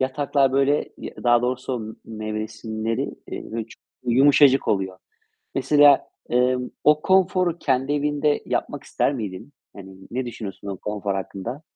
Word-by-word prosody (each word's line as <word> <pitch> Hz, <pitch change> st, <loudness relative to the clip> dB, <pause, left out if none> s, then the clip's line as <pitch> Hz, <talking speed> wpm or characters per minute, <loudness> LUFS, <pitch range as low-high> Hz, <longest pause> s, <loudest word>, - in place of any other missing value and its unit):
yataklar 135 Hz, 0 st, +1 dB
böyle, 140 Hz, +2 st, +2 dB
y -, -, -8 dB
daha 120 Hz, 0 st, +4 dB
doğrusu 125 Hz, 0 st, -2 dB
m 110 Hz, 0 st, -7 dB, 0.3 s
nevresimleri, 110 Hz, +1 st, -3 dB, 0.3 s
eee, -, -, -5 dB
böyle, 115 Hz, -1 st, -3 dB
çu -, -, -16 dB, 0.3 s
yumuşacık 135 Hz, +1 st, +5 dB
oluyor. 95 Hz, -2 st, -1 dB, 0.6 s
Mesela, 145 Hz, +1 st, +5 dB, 0.2 s
emm, 125 Hz, 0 st, +1 dB
o 150 Hz, 0 st, +5 dB
konforu 185 Hz, -2 st, +2 dB
kendi 135 Hz, -1 st, 0 dB
evinde 145 Hz, 0 st, +1 dB
yapmak -, -, -3 dB
ister 140 Hz, -, 0 dB
miydin? 110 Hz, +2 st, -6 dB, 0.2 s
Hani, 95 Hz, -1 st, -11 dB
ne 125 Hz, +1 st, -3 dB
düşünüyorsun 100 Hz, -4 st, -7 dB
o 100 Hz, -, -4 dB
konfor 105 Hz, 0 st, -3 dB
hakkında? 100 Hz, +8 st, -5 dB
125 Hz, 140 wpm, -23 LUFS, 110-145 Hz, 0.6 s, yumuşacık